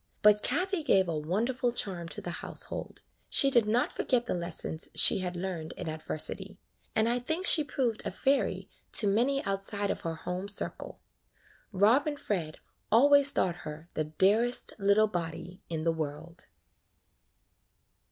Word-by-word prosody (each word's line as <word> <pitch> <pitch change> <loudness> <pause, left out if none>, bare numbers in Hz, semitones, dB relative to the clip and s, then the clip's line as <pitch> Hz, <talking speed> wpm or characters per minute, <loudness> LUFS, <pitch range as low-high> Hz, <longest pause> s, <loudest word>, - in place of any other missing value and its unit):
But 210 0 +5
Kathie 365 - 0
gave 195 - +2
a 165 - -2
wonderful 225 +11 -1
charm 185 -7 -2
to 150 - -7
the 175 - -5
household. - - -4 0.3
She 275 - +4
did 235 -5 +3
not 235 +4 +1
forget 245 -2 -1
the - - -2
lessons 170 -2 -2
she - - +5
had 180 -1 -4
learned 175 -3 -5
in - - -6
adversity, 160 +5 -2 0.4
and 220 +1 +2
I 240 +1 0
think 320 +9 -3
she 310 - +7
proved 250 -6 -1
a - - -3
fairy 275 +1 -1 0.3
to 215 - +7
many 250 +7 +1
outside 200 +1 -1
of - - -5
her 165 -1 -4
home 180 +4 -5
circle. 200 - -2 0.7
Rob 220 +9 +3
and 290 -1 -3
Fred 165 -7 -3 0.3
always 280 +4 +6
thought 175 -9 -1
her 155 +2 -9
the 155 - -2
dearest 205 +10 +1
little 200 +2 +4
body 175 0 -6
in 160 -2 -4
the 165 0 +1
world. 160 +2 -7
200 Hz, 155 wpm, -29 LUFS, 170-245 Hz, 0.7 s, she